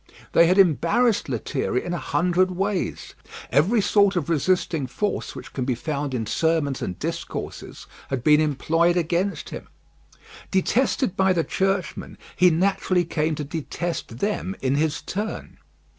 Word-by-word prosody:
They 170 - +6
had 185 +3 +3
embarrassed 190 - +3
Lethierry 125 +1 -2
in 175 - -3
a 175 - -2
hundred 180 +6 +1
ways; 195 +1 -2 0.4
every 185 - +3
sort 200 0 +3
of 170 -2 -1
resisting 165 -3 +1
force 205 - -3
which - - -10
can 130 - -2
be 125 -1 0
found 140 +1 -3
in 115 -3 -2
sermons 155 +2 0
and 90 - -4
discourses - - -6 0.2
had 130 -3 -2
been 150 +2 +5
employed 165 +4 +2
against 175 +4 -1
him. - - -7 0.8
Detested 230 +2 +1
by 190 -1 +3
the 170 -2 +1
churchmen, 190 -4 -2 0.2
he 180 0 +5
naturally 180 +1 +1
came 155 -1 -1
to 150 - -4
detest 160 -3 -4
them 200 +3 -2
in 130 0 0
his 150 +1 0
turn. 210 +3 -5
170 Hz, 145 wpm, -24 LUFS, 150-190 Hz, 0.8 s, They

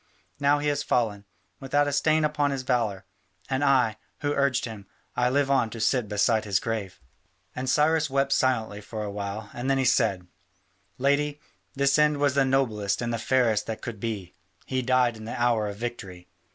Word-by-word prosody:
Now 145 +1 +3
he 145 +1 -2
has 145 0 +1
fallen, 105 -7 0 0.3
without 145 +2 +1
a - - 0
stain 155 +2 +3
upon 150 -1 +1
his 135 -2 -3
valour: 115 -7 -1 0.5
and 135 +2 +1
I, 125 -6 +3 0.2
who 145 -1 0
urged 140 -3 +1
him, 110 -4 -9 0.3
I 125 0 +2
live 140 +1 +1
on 130 -5 +2
to 115 - -8
sit 120 0 +1
beside 110 +2 +2
his 100 -3 +1
grave." 110 -5 -4 0.6
And 130 0 -3
Cyrus 155 +1 +3
wept 135 0 +1
silently 115 -6 +1
for 110 +1 -6
a 105 - -4
while, 100 +1 -5
and 125 +3 -3
then 135 - +3
he 135 - +1
said: 105 -7 +2 0.7
"Lady, 145 +2 +1 0.4
his 140 +1 +3
end 150 -1 +4
was 145 -1 +2
the 140 -1 +3
noblest 115 -7 0
and 120 -1 -2
the 115 - -2
fairest 115 -4 +1
that 110 - -5
could 115 -4 -6
be: 100 -5 -4 0.3
he 130 -1 -1
died 125 -2 +2
in 110 - -9
the 115 - -5
hour 115 -3 +2
of 100 - -5
victory. 100 -6 -6
125 Hz, 190 wpm, -26 LUFS, 110-140 Hz, 0.7 s, end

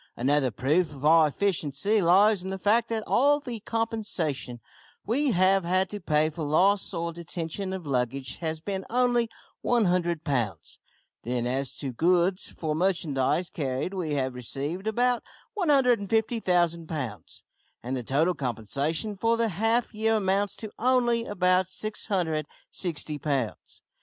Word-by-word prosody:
Another 135 +2 +2
proof 150 - +1
of 140 +1 -7
our 160 0 +6
efficiency 190 +3 0
lies 195 +3 +5
in 190 - -6
the 190 - -3
fact 220 +4 +2
that 225 -1 -2
all 290 +3 +3
the 245 -6 -6
compensation 205 - -2 0.5
we 275 +6 +1
have 190 -2 +3
had 185 +2 +1
to 205 - -4
pay 155 -4 +2
for 160 - -7
loss 185 +7 +2
or 170 -2 -3
detention 170 +3 -5
of 190 -3 -5
luggage 130 -1 -2
has 160 -1 -3
been 190 +3 -4
only 240 -1 +2 0.3
100 180 -8 +1
pounds. 115 - -2 0.4
Then 120 0 -2
as 135 +1 -2
to 135 -3 -3
goods. 180 +7 +2
For 155 -2 -4
merchandise 170 -2 0
carried 140 0 -2
we 165 -6 -2
have 130 -2 -1
received 140 - -4
about 245 +2 +2 0.3
150,000 220 - +2
pounds, 130 -11 -6 0.4
and 125 +2 -3
the 125 - -2
total 150 +9 +1
compensation 140 - -2
for 230 +4 +1
the 230 -1 +1
half 225 +6 0
year 220 +1 +1
amounts 200 -1 0
to 215 -2 -7
only 240 -1 +2
about 185 -2 +2
660 175 -5 -3
pounds. 135 -6 -3
180 Hz, 140 wpm, -27 LUFS, 145-215 Hz, 0.5 s, our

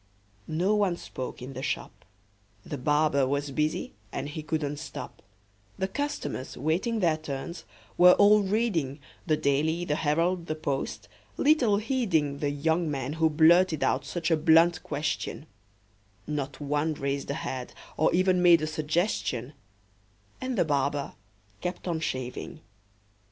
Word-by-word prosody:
No 180 +6 +1
one 200 -5 +1
spoke 130 -5 -7
in 135 +2 -7
the 130 - -6
shop: - - -4 0.6
The 145 - -5
barber 150 0 +2
was 140 +1 -1
busy, 150 +3 -1 0.2
and 140 - -4
he 155 +1 -5
couldn't 150 -2 -2
stop; - - -8 0.6
The 190 0 -1
customers, 285 - -4
waiting 185 - 0
their 165 -3 +3
turns, 155 +3 -6 0.3
were 180 0 +9
all 210 +1 +6
reading 190 - 0 0.3
The 155 -2 +3
"Daily," 155 +5 +1
the 150 -2 0
"Herald," 170 +3 0
the 155 - -2
"Post," 140 -3 -3 0.3
little 265 -9 +4
heeding 190 - 0
The 145 - 0
young 160 +3 0
man 135 -1 -3
who 160 0 +2
blurted 160 +1 +4
out - - +1
such 170 -1 -3
a 160 - +4
blunt 165 +2 +5
question; 150 0 -3 0.8
Not 140 -1 -4
one 150 +2 -1
raised 140 0 -3
a 140 - -1
head, 130 -6 -5 0.2
or 155 - +3
even 185 0 +3
made 170 -3 +6
a - - +2
suggestion; 155 - -1 0.9
And 255 -2 -2
the 175 - +3
barber 140 -1 0 0.5
kept 180 +1 -4
on 165 -2 -1
shaving. 130 +3 -4
155 Hz, 145 wpm, -28 LUFS, 145-180 Hz, 0.9 s, were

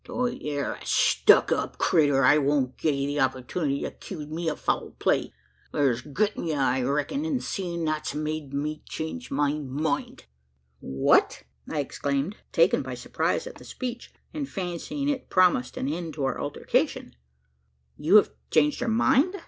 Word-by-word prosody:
Tho' 250 - -2
ye 240 -10 -3
air 140 - -1
a - - -11
stuck - - +4
up - - -1
critter, 145 -4 +3
I 145 +3 +6
won't 140 -3 +1
gi' 160 - 0
ye 140 -1 0
the 145 +1 -2
opportunity 135 +3 -1
to - - -3
'kuse 150 -1 -8
me 165 +1 -2
o' 150 - -2
foul - - -2
play. - - +1 0.4
Thur's 130 -5 +1
grit 205 - -1
in - - -4
ye, 155 - 0
I 130 -2 +1
reck'n; 145 - -1
and 305 -5 0
seein' 170 -3 -3
that's 155 -1 -2
made 155 -2 -3
me 150 +2 -3
change 160 +11 -5
my 145 +1 +1
mind." 145 +1 -3 0.5
"What!" 65 -2 +2 0.3
I 150 - 0
exclaimed, 140 +7 -2
taken - - +4
by - - -5
surprise - - -1
at - - -9
the - - -13
speech, 245 -2 -6 0.2
and 295 -3 -4
fancying 190 - -4
it 280 -3 -2
promised 180 -9 +3
an 130 - -2
end 160 0 -4
to 145 - -3
our 135 - -2
altercation - - -1 0.8
"you 160 +7 +2
have 215 - +7 0.2
changed 150 -1 +3
your - - 0
mind? 265 - +3
150 Hz, 175 wpm, -26 LUFS, 140-190 Hz, 0.8 s, have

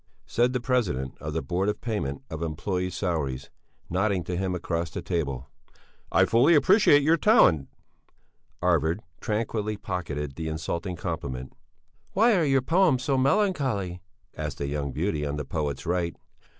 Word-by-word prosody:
said 120 +2 +2
the 125 - -1
President 110 - -1
of 75 - -5
the 80 +1 -2
Board 95 +3 0
of 105 - -2
Payment 70 - -3
of 80 - -4
Employés' 90 +3 -2
Salaries, 75 -10 -2 0.4
nodding 95 0 0
to 90 - -3
him 95 0 -1
across 85 -1 -2
the - - -6
table. 70 -7 -2 0.6
"I 95 +2 +5
fully 125 - +5
appreciate 145 -1 +5
your 160 +3 +4
talent." 115 - +5 1.0
Arvid 85 +1 +2 0.2
tranquilly 110 -1 -2
pocketed 75 -8 -4
the 80 -1 -3
insulting 85 +3 -3
compliment. 70 -7 -5 0.6
"Why 225 +3 +5
are 175 - +3
your 135 -2 +3
poems 165 -6 +3
so 135 +1 +1
melancholy?" 130 - +1 0.3
asked 75 -2 -5
a 70 - -1
young 70 0 -2
beauty 75 0 -1
on 70 0 -2
the 75 -1 -4
poet's 70 -3 -3
right. 85 0 -1
90 Hz, 150 wpm, -26 LUFS, 75-120 Hz, 1.0 s, I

